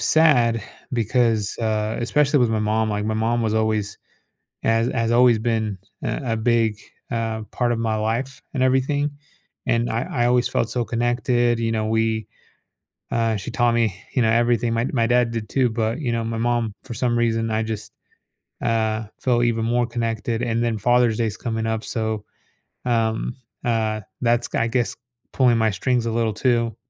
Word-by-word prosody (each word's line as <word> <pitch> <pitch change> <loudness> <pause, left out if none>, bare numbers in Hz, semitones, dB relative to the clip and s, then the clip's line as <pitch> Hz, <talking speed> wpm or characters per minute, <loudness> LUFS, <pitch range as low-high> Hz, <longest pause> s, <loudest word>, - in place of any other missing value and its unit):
sad 125 -8 +4 0.3
because, 115 -3 +1
uh, 110 -1 -1
especially 145 +5 +2
with 120 -3 +3
my 110 - +1
mom 110 +1 +1
like, 105 0 -1
my 110 - -1
mom 115 +2 +1
was 110 -1 0
always 110 -2 0 0.6
has 115 +1 +2
has 115 -1 0
always 120 -1 +5
been, 110 -3 -1 0.3
uh, - - -2
a 115 -2 0
big, 110 -2 +1 0.3
uh, 115 -2 -2
part 120 -1 0
of 115 - -1
my 110 -1 0
life 115 +5 -2
and 130 - 0
everything. 135 +3 +2 0.6
And 120 -1 +1
I 115 - 0 0.2
I - - +4
always 125 0 +3
felt 115 - 0
so 120 0 -1
connected 120 0 +1
you 115 -1 0
know, 110 -1 0
we 110 -1 0 0.8
uh, 115 -2 +1
she 95 - -5
taught 120 -1 +2
me, 115 -5 +2 0.2
you 125 - +3
know, 110 - +3
everything, 120 0 +2
my 115 +2 +1
my 115 -3 +2
dad 120 -1 +3
did 110 -2 -4
too, 130 -2 +2
but, 110 +3 -1
you 125 -6 -1
know, 115 -1 -1
my 115 0 -3
mom, 120 -2 0
for 125 - -7
some 120 +1 0
reason, 115 -1 +1
I 110 0 +1
just, 110 -1 -5 0.7
uh, 110 -1 0 0.2
feel 120 -2 +2
even 115 -1 +1
more 120 +1 +1
connected, 115 0 -2
and 115 -1 0
then 115 -2 0
Father's 120 0 +3
Day 115 - +1
is 105 -1 -3
coming 115 -2 -3
up, 110 0 -2
so, 110 -2 -2 0.6
um, 115 -1 0 0.3
uh, 110 -2 0 0.2
that's, 120 -1 +2
g - - -2
I 115 - +2
guess, 120 0 0 0.4
pulling 125 -3 +4
my 110 -1 +3
strings 120 +5 0
a 115 - -1
little 115 -2 0
too. 115 0 +1
115 Hz, 185 wpm, -22 LUFS, 110-120 Hz, 0.8 s, always